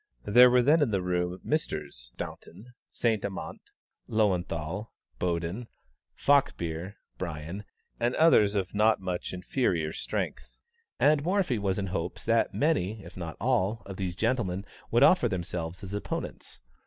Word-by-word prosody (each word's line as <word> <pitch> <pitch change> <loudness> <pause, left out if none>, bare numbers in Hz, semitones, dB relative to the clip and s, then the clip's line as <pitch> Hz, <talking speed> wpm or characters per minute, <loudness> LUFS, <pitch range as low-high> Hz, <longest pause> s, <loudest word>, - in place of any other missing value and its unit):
There 125 +5 +7
were 125 0 +4
then 150 +5 +5
in 145 - +3
the 100 -3 +1
room 90 0 -1
Messrs. - - -2
Staunton, 110 +8 -8 0.2
Saint 110 -3 0
Amant, 100 -2 -5 0.5
Löwenthal, 95 -2 0 0.3
Boden, 90 +6 -2 0.5
Falkbeer, 95 - +1 0.2
Brien, 85 +4 -5 0.3
and 120 +1 +1
others 105 -11 +5
of 95 -3 -1
not 110 +1 +4
much 90 -2 -3
inferior 90 - -1
strength, - - -4 0.4
and 145 -1 +4
Morphy 180 - +1
was 95 -2 0
in 100 - -1
hopes 90 -3 -4
that 115 0 +3
many, 110 - 0
if 85 +1 -12
not 80 -4 -6
all, 100 +3 +1
of 95 -1 -8
these 90 -3 -3
gentlemen 100 -4 0 0.2
would - - +4
offer - - +5
themselves 85 0 -4
as 95 +1 -6
opponents. 105 - -5
100 Hz, 140 wpm, -28 LUFS, 90-115 Hz, 0.5 s, There